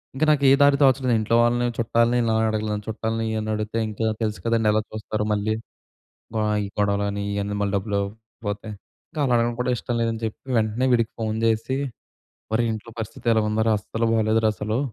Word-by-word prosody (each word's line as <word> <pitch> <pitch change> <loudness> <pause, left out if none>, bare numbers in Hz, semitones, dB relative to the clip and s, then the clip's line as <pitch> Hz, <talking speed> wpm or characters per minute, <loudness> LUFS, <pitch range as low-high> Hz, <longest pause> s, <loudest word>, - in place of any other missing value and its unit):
ఇంక 140 - -1
నాకు 145 -2 +2
ఏ - - +6
దారి 140 0 +6
తోచలేదు. 130 -2 +3
ఇంట్లో 110 +2 +1
వాళ్ళని 120 +1 +2
చుట్టాలని 115 +1 +2
ఇలా 115 -1 +1
అడగలేను 105 -1 -2
చుట్టాలని 110 +1 -2
ఇయ్యు 110 0 -1
అని 110 - -4
అడిగితే 105 +1 -3
ఇంట్లో 110 +1 -1
తెలుసు 105 -1 -2
కదండీ 115 -2 +2
ఎలా 110 +1 +2
చూస్తారు 110 0 -3
మళ్ళీ. 105 +1 0 0.9
ఆహ్, 105 0 +1
ఈ - - -3
గొడవలు 100 0 +1
అని 100 0 -3
ఇయన్నీ 100 0 -2
మళ్ళీ 100 - 0
డబ్బులు 100 +1 -1
ఇవ్వకపోతే. 105 0 -6 0.4
ఇంక - - -9
అలా 125 -3 +2
అడగడం 120 0 +1
కూడా 125 - +1
ఇష్టం 120 - -3
లేదని 115 -1 -1
చెప్పి 110 +4 -6
వెంటనే 110 +3 +1
వీడికి 115 -2 +2
ఫోన్ 110 -1 -1
జేసి, 115 +3 +1 0.8
"ఒరే 115 +2 +2
ఇంట్లో 110 +1 -7
పరిస్థితి 110 +1 -7
ఇలా 110 -1 +3
ఉందిరా 110 +1 +2
అస్సలు 115 +2 -2
బాలేదురా 110 0 +3
అసలు. 110 +4 -2
110 Hz, 190 wpm, -24 LUFS, 105-115 Hz, 0.9 s, ఏ